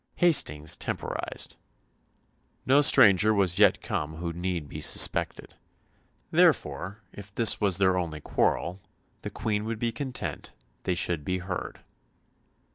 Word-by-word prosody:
Hastings 80 Hz, -, +1 dB
temporised. -, -, -5 dB, 1.1 s
No 140 Hz, +2 st, +4 dB
stranger 105 Hz, -5 st, +5 dB
was 95 Hz, -2 st, 0 dB
yet 100 Hz, -3 st, +4 dB
come 75 Hz, +1 st, -4 dB
who 85 Hz, +1 st, -5 dB
need 85 Hz, -3 st, -4 dB
be -, -, -8 dB
suspected. -, -, +3 dB, 0.8 s
Therefore, 100 Hz, +4 st, 0 dB
if 100 Hz, 0 st, -12 dB
this 115 Hz, -2 st, +3 dB
was 100 Hz, -4 st, +2 dB
their 95 Hz, -1 st, +2 dB
only 80 Hz, -3 st, -5 dB
quarrel, 85 Hz, +4 st, -1 dB, 0.4 s
the -, -, -6 dB
Queen 105 Hz, -2 st, -3 dB
would 115 Hz, 0 st, -4 dB
be 115 Hz, +1 st, -2 dB
content 130 Hz, +2 st, -6 dB, 0.3 s
they 90 Hz, -, 0 dB
should 85 Hz, -3 st, -1 dB
be 90 Hz, +5 st, -2 dB
heard. 90 Hz, 0 st, -6 dB
95 Hz, 125 wpm, -26 LUFS, 85-110 Hz, 1.1 s, stranger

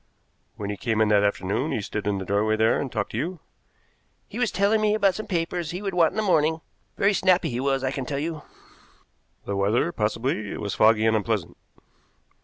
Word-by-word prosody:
"When 100 Hz, -1 st, -4 dB
he 100 Hz, -, -5 dB
came 110 Hz, -2 st, -1 dB
in 110 Hz, -1 st, +3 dB
that 105 Hz, -1 st, +4 dB
afternoon 100 Hz, +7 st, -1 dB
he -, -, -1 dB
stood 105 Hz, 0 st, -4 dB
in 100 Hz, -1 st, 0 dB
the 95 Hz, -, -5 dB
doorway 105 Hz, +3 st, +1 dB
there 110 Hz, +1 st, +2 dB
and 135 Hz, -, -4 dB
talked 105 Hz, -3 st, -3 dB
to 110 Hz, -, -3 dB
you?" 170 Hz, +5 st, -3 dB, 0.9 s
"He 225 Hz, -, -7 dB
was 245 Hz, -3 st, +2 dB
telling 205 Hz, +2 st, +2 dB
me 210 Hz, 0 st, +2 dB
about 200 Hz, -3 st, +3 dB
some 215 Hz, -, -6 dB
papers 170 Hz, -2 st, -2 dB
he 180 Hz, +4 st, -5 dB
would 195 Hz, -2 st, -2 dB
want 170 Hz, -3 st, +4 dB
in -, -, -8 dB
the 215 Hz, -, +1 dB
morning. 160 Hz, -4 st, +2 dB, 0.4 s
Very 200 Hz, +1 st, +3 dB
snappy 185 Hz, -5 st, +2 dB
he 120 Hz, -, -3 dB
was, 135 Hz, 0 st, 0 dB
I 130 Hz, -, 0 dB
can 135 Hz, -2 st, -4 dB
tell 140 Hz, -, -2 dB
you." 155 Hz, +1 st, -3 dB, 1.0 s
"The 100 Hz, -, -3 dB
weather, 105 Hz, +11 st, +1 dB
possibly. 110 Hz, -, -2 dB
It -, -, -6 dB
was 100 Hz, -2 st, -3 dB
foggy 110 Hz, 0 st, +4 dB
and 110 Hz, 0 st, +3 dB
unpleasant." 105 Hz, -4 st, -1 dB
130 Hz, 215 wpm, -25 LUFS, 105-175 Hz, 1.0 s, that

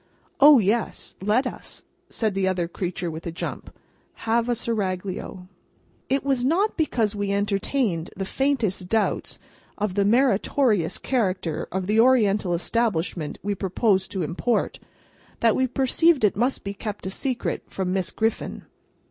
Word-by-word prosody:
"O, 290 Hz, 0 st, +9 dB
yes! 220 Hz, +1 st, 0 dB
Let 215 Hz, +7 st, +2 dB
us," 250 Hz, -, -7 dB, 0.3 s
said 220 Hz, -3 st, -1 dB
the 190 Hz, 0 st, 0 dB
other 180 Hz, -2 st, 0 dB
creature 175 Hz, -1 st, -4 dB
with 160 Hz, +2 st, -7 dB
a -, -, -3 dB
jump, 165 Hz, -, -6 dB, 0.5 s
"have 230 Hz, +1 st, +1 dB
a 240 Hz, -, +2 dB
Seraglio." 190 Hz, -4 st, -3 dB, 0.6 s
It 270 Hz, +1 st, +1 dB
was 270 Hz, -3 st, 0 dB
not 360 Hz, +11 st, +2 dB
because 235 Hz, -, 0 dB
we 200 Hz, -1 st, -1 dB
entertained 200 Hz, -2 st, 0 dB
the 195 Hz, -, -2 dB
faintest 220 Hz, -8 st, -1 dB
doubts 220 Hz, -2 st, 0 dB, 0.4 s
of 210 Hz, -3 st, -1 dB
the 200 Hz, +1 st, +2 dB
meritorious 220 Hz, -, +2 dB
character 185 Hz, -, -1 dB
of 190 Hz, 0 st, -2 dB
the 210 Hz, +3 st, +2 dB
Oriental 210 Hz, -7 st, +4 dB
establishment 175 Hz, -5 st, -1 dB
we 205 Hz, +1 st, 0 dB
proposed 190 Hz, +1 st, +1 dB
to 190 Hz, -3 st, -1 dB
import, 180 Hz, +9 st, -1 dB, 0.6 s
that 230 Hz, -2 st, +3 dB
we 260 Hz, -, +2 dB
perceived 270 Hz, +3 st, +2 dB
it 210 Hz, -, +3 dB
must 245 Hz, +6 st, 0 dB
be 200 Hz, -, -4 dB
kept 205 Hz, 0 st, -6 dB
a 190 Hz, -, -3 dB
secret 250 Hz, +3 st, -2 dB
from 185 Hz, -1 st, -3 dB
Miss 190 Hz, -2 st, 0 dB
Griffin. 225 Hz, 0 st, -2 dB
205 Hz, 150 wpm, -24 LUFS, 185-245 Hz, 0.6 s, O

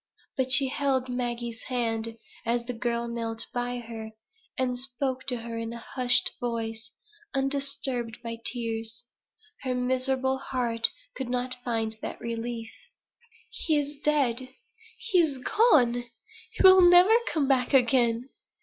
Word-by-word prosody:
But 260 Hz, -1 st, 0 dB
she 275 Hz, 0 st, +5 dB
held 265 Hz, -2 st, 0 dB
Maggie's 240 Hz, -2 st, -3 dB
hand, 230 Hz, -2 st, -2 dB, 0.3 s
as 235 Hz, +1 st, 0 dB
the 250 Hz, -, -4 dB
girl 235 Hz, 0 st, -1 dB
knelt 230 Hz, -1 st, -3 dB
by 245 Hz, 0 st, -2 dB
her, 225 Hz, -2 st, -7 dB, 0.5 s
and 255 Hz, -1 st, 0 dB
spoke 260 Hz, 0 st, -3 dB
to 250 Hz, -, 0 dB
her 230 Hz, 0 st, -5 dB
in 230 Hz, 0 st, -4 dB
a -, -, -6 dB
hushed 250 Hz, +1 st, +1 dB
voice, 230 Hz, -1 st, -3 dB, 0.5 s
undisturbed 270 Hz, -4 st, -1 dB
by 230 Hz, -1 st, -5 dB
tears. 230 Hz, 0 st, -2 dB, 0.6 s
Her 255 Hz, -2 st, -1 dB
miserable 260 Hz, +1 st, 0 dB
heart 240 Hz, -4 st, 0 dB, 0.3 s
could 265 Hz, -2 st, -4 dB
not 250 Hz, 0 st, -3 dB
find 225 Hz, -3 st, -2 dB
that -, -, -5 dB
relief. 230 Hz, 0 st, -4 dB, 0.8 s
"He 315 Hz, -3 st, 0 dB
is 290 Hz, 0 st, -3 dB
dead! 260 Hz, -4 st, +1 dB, 0.5 s
he 390 Hz, -6 st, +1 dB
is 305 Hz, -5 st, +2 dB
gone! 250 Hz, -, +3 dB, 0.4 s
he -, -, -2 dB
will 375 Hz, 0 st, +9 dB
never 355 Hz, +4 st, +8 dB, 0.2 s
come 295 Hz, -4 st, +1 dB
back 255 Hz, -2 st, +2 dB
again! 245 Hz, -1 st, +3 dB
245 Hz, 135 wpm, -27 LUFS, 235-265 Hz, 0.8 s, will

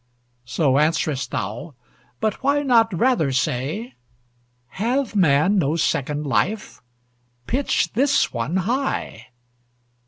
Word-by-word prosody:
So 135 Hz, 0 st, +1 dB
answerest 155 Hz, -3 st, 0 dB
thou; 115 Hz, -, -5 dB, 0.4 s
but 215 Hz, -2 st, -2 dB
why 285 Hz, +2 st, +1 dB
not 230 Hz, -4 st, +4 dB
rather 185 Hz, -, +1 dB
say, 135 Hz, -, -2 dB, 0.8 s
"Hath 240 Hz, -, -1 dB
man 180 Hz, +2 st, +3 dB
no 155 Hz, -1 st, +1 dB
second 150 Hz, -2 st, -1 dB
life? 205 Hz, +9 st, -1 dB, 0.6 s
Pitch 270 Hz, -, 0 dB
this 280 Hz, +4 st, +2 dB
one 120 Hz, +8 st, -2 dB
high! 240 Hz, -, -2 dB
175 Hz, 100 wpm, -22 LUFS, -, 0.8 s, not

